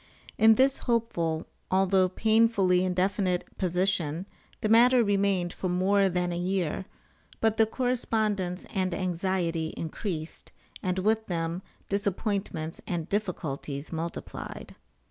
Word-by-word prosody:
In 220 0 +6
this 265 +3 +3
hopeful, 170 -9 0 0.2
although 190 0 +3
painfully 215 -3 +3
indefinite 185 0 0
position 180 -2 0 0.4
the - - +1
matter 240 +3 +6
remained 195 -4 +1
for 185 - -3
more 190 +2 +3
than 180 -1 -1
a 170 - -2
year; 185 -1 -1 0.5
but 225 -1 +2
the 220 - +5
correspondence 215 -7 -1
and 185 -3 0
anxiety 175 -3 -1
increased, 165 -1 -5 0.3
and 185 0 -1
with 220 +3 +1
them 170 0 -2 0.3
disappointments 200 -4 -2
and 170 -2 -3
difficulties 155 -8 -3
multiplied. 165 +1 -6
185 Hz, 110 wpm, -28 LUFS, 175-210 Hz, 0.5 s, In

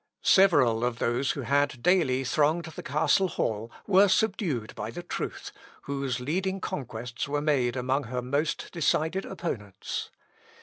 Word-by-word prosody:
Several 130 -12 +5
of 120 -1 0
those 120 +4 0
who 140 - -5
had 140 0 0
daily 155 -8 +3
thronged 155 +5 +1
the 160 -2 -8
castle 160 +7 +2
hall 115 - -2
were 200 0 +5
subdued 180 - 0
by 105 - -5
the 175 +9 -7
truth, - - -5 0.3
whose 135 -3 -2
leading 185 +9 -1
conquests 120 -6 -5
were 145 +1 -1
made 140 -5 +1
among 130 +2 0
her 125 +1 -3
most 145 +5 -1
decided 165 +3 0
opponents. 110 - -5
140 Hz, 140 wpm, -28 LUFS, 125-170 Hz, 0.3 s, Several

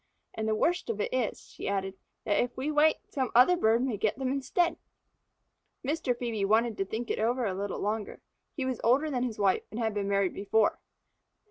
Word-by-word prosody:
And 220 0 -3
the 215 - +2
worst 350 +9 0
of 220 -2 -2
it - - -2
is," 250 -4 -1
she - - -7
added, 195 -1 -1 0.3
"that 205 - +1
if 245 0 -6
we 275 +4 -1
wait, 305 +1 +4
some 260 -4 -2
other 255 +9 +7
bird 230 -7 +3
may 250 -5 -1
get 210 +3 0
them 260 -1 -1
instead." 280 +6 0 1.1
Mr. 275 -3 0
Phœbe 230 -4 -2
wanted 220 +3 +2
to 195 - 0
think 225 +4 -4
it - - -2
over 240 +3 +1
a 195 - -1
little 195 +1 -3
longer. 210 0 -3 0.4
He 275 - -2
was 260 -2 -2
older 280 +6 +3
than 250 -3 -1
his 245 -3 -2
wife 195 -2 +2
and 215 - -6
had 220 -2 0
been 200 -1 -2
married 200 -2 +1
before. 205 +2 +1
230 Hz, 210 wpm, -29 LUFS, 205-260 Hz, 1.1 s, other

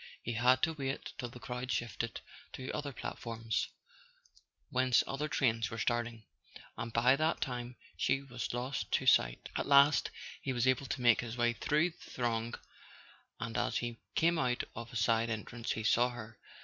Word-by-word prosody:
He 120 - -2
had 125 +3 +4
to 160 - +3
wait 135 -2 -4
till 120 - -3
the 125 - -11
crowd 125 +1 -4
shifted 115 0 -2 0.3
to 130 0 -5
other 145 -1 -3
platforms, 115 -2 -3 1.0
whence 130 -1 +4
other 140 +3 -2
trains 115 -7 +1
were 115 - -6
starting, 120 -1 -1 0.5
and 115 - -4
by 120 +3 +5
that 155 +3 +1
time 125 -1 -3 0.2
she 135 - +1
was 125 -3 -4
lost 125 +3 -3
to - - +2
sight. - - +3
At - - -1
last 140 +1 +6 0.3
he 135 - -2
was 120 0 +1
able 130 +1 +2
to 125 - -3
make 120 -2 +5
his 120 0 -6
way 120 0 +3
through 155 +8 +1
the - - -15
throng, 115 -1 -1 0.8
and 115 -1 -4
as - - +1
he 120 -1 -3 0.2
came 170 0 +3
out 125 -1 +1
of 115 +1 -7
a - - -10
side 115 +1 +2
entrance 115 +1 -3
he 110 - -4
saw 120 +3 +4
her. 115 -2 -9
120 Hz, 175 wpm, -33 LUFS, 115-130 Hz, 1.0 s, last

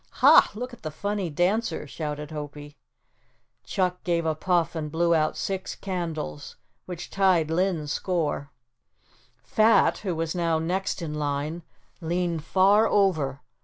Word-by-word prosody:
"Ha, - - +7
look 250 +3 -5
at - - -12
the 155 - -4
funny 200 +3 -3
dancer," 180 +4 0
shouted 150 0 -5
Hopie. 145 -1 -7 0.9
Chuck 180 -2 -1
gave 170 -2 0
a 160 - +1
puff 170 +1 0
and 155 -3 -4
blew 170 +1 +2
out 155 -1 +1
six 190 -1 -3
candles 165 - -5 0.3
which 180 -2 -7
tied 185 -5 +2
Linn's 165 -4 0
score. 155 -6 -1 0.9
Fat, 220 +1 +3
who 185 -5 -3
was 165 0 -2
now 170 -2 +1
next 180 +3 -2
in 155 -2 -4
line, 150 +2 -2 0.4
leaned 170 -1 -1
far 195 +5 +4
over. 155 -9 +1
170 Hz, 135 wpm, -26 LUFS, 155-185 Hz, 0.9 s, Ha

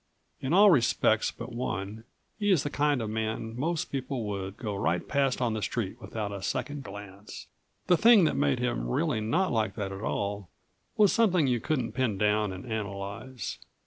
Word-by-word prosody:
In 130 - -3
all 200 +3 +7
respects 125 -8 +3
but - - -8
one 110 -2 -4 0.3
he 205 -1 +1
is 180 -8 +4
the 145 - -3
kind 145 -4 +1
of 110 - -3
man 110 +1 -3
most 155 +5 -2
people 130 -2 -3
would 100 0 -4
go 110 -4 -4
right 90 -2 -1
past 135 -2 +1
on 115 -2 +1
the 110 - -3
street 110 +2 -3
without 105 0 -4
a 100 -1 -6
second 130 +8 -3
glance. 100 -1 -9 0.4
The 180 - +4
thing 225 -1 +7
that 160 - +2
made 140 -2 +2
him 120 - -1
really 110 - 0
not 165 - +1
like 110 -4 0
that 100 -2 -3
at 95 0 -7
all 100 -3 -3 0.5
was 205 -3 +5
something 185 -9 +3
you 125 -3 +1
couldn't 130 -2 -1
pin 125 -6 0
down 105 0 +2
and 95 0 -8
analyze. 100 +1 -5
115 Hz, 185 wpm, -28 LUFS, 100-140 Hz, 0.5 s, all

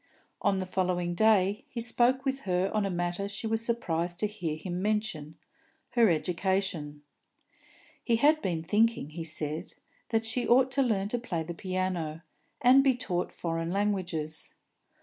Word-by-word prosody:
On 200 -1 +2
the 190 - -2
following 180 -1 -1
day 205 0 +3
he 235 - -5
spoke 245 +3 +3
with 270 0 0
her 180 +2 +1
on 210 -2 +1
a - - -2
matter 175 +2 -2
she 200 +2 -5
was 225 0 +1
surprised 175 -7 -1
to - - +3
hear 190 -7 -3
him 180 +2 -4
mention, 205 -8 -2 0.5
her 235 -3 +4
education. 170 -2 -1 1.0
He 235 - +2
had 300 +6 +4
been 170 - -2
thinking, 210 -2 +1
he 165 +1 -5
said, 155 -1 -4 0.3
that 225 -1 +1
she 235 +2 -1
ought 255 +2 +4
to 275 - +2
learn 205 -6 +1
to 245 - -1
play 175 -9 -3
the 170 +2 -6
piano, 180 -3 -3 0.4
and 260 +3 +7
be 265 -2 +4
taught 180 -7 -2
foreign 165 -1 -3
languages. 180 -6 -2
190 Hz, 160 wpm, -29 LUFS, 170-225 Hz, 1.0 s, and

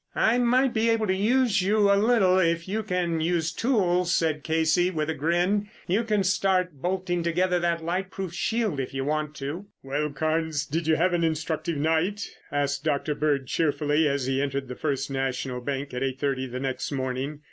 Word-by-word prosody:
"I 235 +3 +3
might 250 +2 +3
be 225 +1 +2
able 225 -1 +2
to 190 -2 +1
use 225 +1 +2
you 205 +1 +3
a - - +4
little 200 -3 +4
if 170 -1 +1
you 215 +3 -1
can 180 -5 -1
use 165 -1 0
tools," 180 -5 +1
said 155 -3 +1
Casey 160 +2 +2
with 160 -3 -2
a - - -2
grin. 175 +7 0 0.2
"You 200 +6 +1
can 210 -3 +1
start 185 -2 +1
bolting 180 -1 -1
together 180 +2 +1
that 170 -1 0
light 180 +3 -2
proof 190 -3 -5
shield 215 -4 -1
if 135 0 -4
you 135 0 -2
want 150 0 -2
to." 150 +9 -5 0.2
"Well, 145 +3 -1
Carnes, 155 0 -1
did 160 +2 -3
you 160 - +4
have 175 +3 +2
an 170 -1 +1
instructive 160 0 -1
night?" 165 +7 0 0.2
asked 140 0 -1
Dr. 150 -1 0
Bird 145 -2 0
cheerfully 150 +1 +1
as 140 -2 0
he 135 +1 0
entered 135 -2 -2
the 125 - -5
First 140 -1 -2
National 130 -1 -2
Bank 140 +1 -4
at 125 - -3
eight 135 0 -2
thirty 135 -2 -1
the 125 +1 -5
next 130 +1 -3
morning. 130 +2 -3
165 Hz, 195 wpm, -26 LUFS, 145-185 Hz, 0.2 s, a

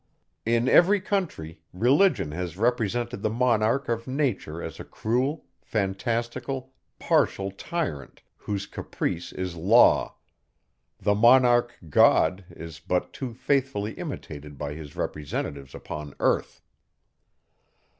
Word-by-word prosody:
In 115 +1 +2
every 190 +9 +6
country, 175 - -3
Religion 125 - +3
has 90 +1 -5
represented 120 -1 0
the 110 - 0
Monarch 120 +2 +1
of 115 +1 -2
nature 130 - -2
as - - -7
a - - -6
cruel, 130 +7 -2 0.2
fantastical, 120 +6 -3 0.2
partial 95 0 +1
tyrant, 100 - -5
whose 100 -1 -4
caprice 85 -3 -4
is 90 -2 -4
law; 100 +9 +4 0.8
the 105 +1 +2
Monarch 120 +2 +5
God, 85 +4 +4
is 80 -3 -10
but 90 +4 -2
too 125 -4 -6
faithfully 125 -5 0
imitated 75 - -7
by 75 0 -4
his 75 -2 -10
representatives 70 -2 -4
upon 75 -2 -7
earth. - - 0
110 Hz, 110 wpm, -26 LUFS, 85-125 Hz, 0.8 s, every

